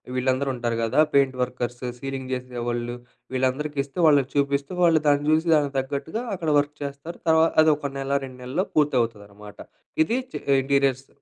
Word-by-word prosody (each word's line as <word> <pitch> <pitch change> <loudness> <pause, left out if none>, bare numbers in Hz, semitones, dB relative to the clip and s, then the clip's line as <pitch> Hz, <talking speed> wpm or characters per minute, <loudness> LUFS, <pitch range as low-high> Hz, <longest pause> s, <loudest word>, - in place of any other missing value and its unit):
వీళ్ళందరూ 130 +2 0
ఉంటారు 120 -1 -2
గదా! 120 +6 +1
పెయింట్ 135 -2 +3
వర్కర్స్, 125 -1 -3 0.2
సీలింగ్ 135 -1 -5
జేసేవాళ్ళు 120 -1 -3 0.4
వీళ్ళందరికిస్తూ, 140 +2 -1
వాళ్ళకి 140 -3 +4
చూపిస్తూ 140 +1 0
వాళ్ళు 165 -2 +4
దాన్ని 145 0 +3
జూసి 160 +2 +2
దానికి 145 -2 0
తగ్గట్టుగా 140 - -4
అక్కడ 165 -4 -3
వర్క్ 145 +1 -2
చేస్తారు. 140 +4 -7
తర్వా 160 0 +5 0.2
అదొక 150 -3 +2
నెల, 135 0 -4
2 130 -1 -12
నెలల్లో 155 +10 -1
పూర్తి 150 -3 +3
అవుతదనమాట. 105 -2 -7 0.5
ఇది 235 +10 0
చె - - -3 0.2
ఇంటీరియర్స్ 135 -1 +1
140 Hz, 150 wpm, -24 LUFS, 125-145 Hz, 0.5 s, తర్వా